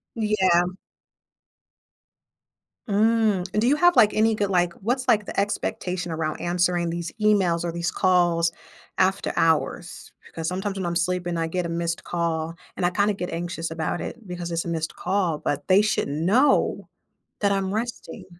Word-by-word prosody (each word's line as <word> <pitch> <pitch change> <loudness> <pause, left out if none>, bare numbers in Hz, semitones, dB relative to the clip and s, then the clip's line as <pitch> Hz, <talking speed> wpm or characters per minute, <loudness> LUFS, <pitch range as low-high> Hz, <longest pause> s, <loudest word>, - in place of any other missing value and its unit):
Yeah. 210 -6 +3 2.3
Mm, 215 -2 +2 0.2
do 235 - +2
you 285 - +4
have, 350 +3 +4
like, 215 -4 +6
any 220 +1 +3
good 205 -2 -1
like, 175 -2 +1
what's, 250 +5 -1
like, 210 -2 +3
the - - -3
expectation 180 -3 -2
around 160 -1 -3
answering 175 0 +1
these 170 -1 -4
emails 190 -6 +3
or 170 - -2
these 170 +1 -2
calls 175 -3 +2 0.5
after 190 +1 +1
hours? 165 +2 0
Because 165 -1 -6
sometimes 190 +2 -3
when 185 - -3
I'm 170 - -2
sleeping, 175 0 0
I 165 0 -1
get 180 +2 -2
a - - -3
missed 170 0 -2
call, 165 -1 -2 0.2
and 180 - -1
I - - +4
kinda 205 +2 +1
get 180 -2 -5
anxious 170 -1 -4
about 160 +1 -3
it 230 -4 -7
because 175 -1 -5
it's 165 0 -2
a - - -5
missed 160 -1 -3
call, 180 -4 0
but 145 -1 -3
they 190 +2 +6
should 215 +1 0
know 180 - +2 0.5
that 200 - +3
I'm 195 -1 -1
resting. 225 -3 -5
180 Hz, 165 wpm, -24 LUFS, 170-205 Hz, 2.3 s, like